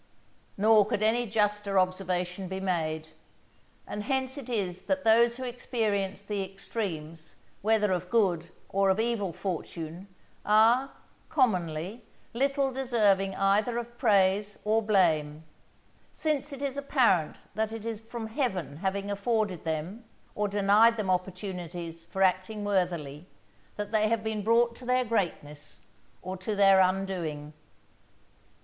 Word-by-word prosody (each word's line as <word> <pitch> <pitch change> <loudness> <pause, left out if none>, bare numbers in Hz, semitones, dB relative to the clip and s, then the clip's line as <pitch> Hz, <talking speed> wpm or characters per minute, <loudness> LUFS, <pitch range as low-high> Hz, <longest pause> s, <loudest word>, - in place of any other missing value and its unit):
_" - - -36 0.5
Nor 210 0 +5
could 215 -2 -1
any 235 +2 +2
juster 210 -2 0
observation 185 0 -1
be 190 +1 -4
made. 160 -4 -2 0.8
And 210 - -5
hence 265 -1 -1
it 270 -4 -8
is 185 -6 -2
that 280 0 0
those 235 +2 +4
who 260 - -6
experience 220 -6 -2
the 205 -1 -2
extremes 170 -5 -6 0.3
whether 210 -1 +2
of 180 -1 -2
good 180 -7 +1 0.2
or 195 0 +2
of 190 +2 +2
evil 220 -5 0
fortune, 170 0 -5 0.4
are, 230 +6 +4 0.4
commonly, 185 - 0 0.3
little 275 +2 +1
deserving 210 -7 +1
either 210 +5 +2
of 240 0 -6
praise 205 -3 +2
or 220 +1 +3
blame; 160 -8 +2 0.7
since 295 -2 -2
it 280 0 -7
is 280 -1 -2
apparent 245 - +2 0.2
that 220 +2 -1
it 225 -1 -7
is 225 -2 -4
from 230 0 -6
Heaven 190 - -2
having 195 +3 -2
afforded 200 -4 -1
them, 165 +8 -3 0.3
or 210 0 0
denied 205 +3 +4
them 200 -4 0
opportunities 180 -3 -4
for 190 +3 -1
acting 190 +3 +1
worthily, 175 -6 -1 0.5
that 205 0 -5
they 215 -1 +3
have 225 -1 0
been 220 -1 -2
brought 235 +2 +3
to 255 - -11
their 255 0 +2
greatness 160 -9 -3 0.4
or 185 +1 -5
to 195 +3 -3
their 195 -1 +6
undoing. 180 -6 -1
200 Hz, 135 wpm, -28 LUFS, 185-230 Hz, 0.8 s, their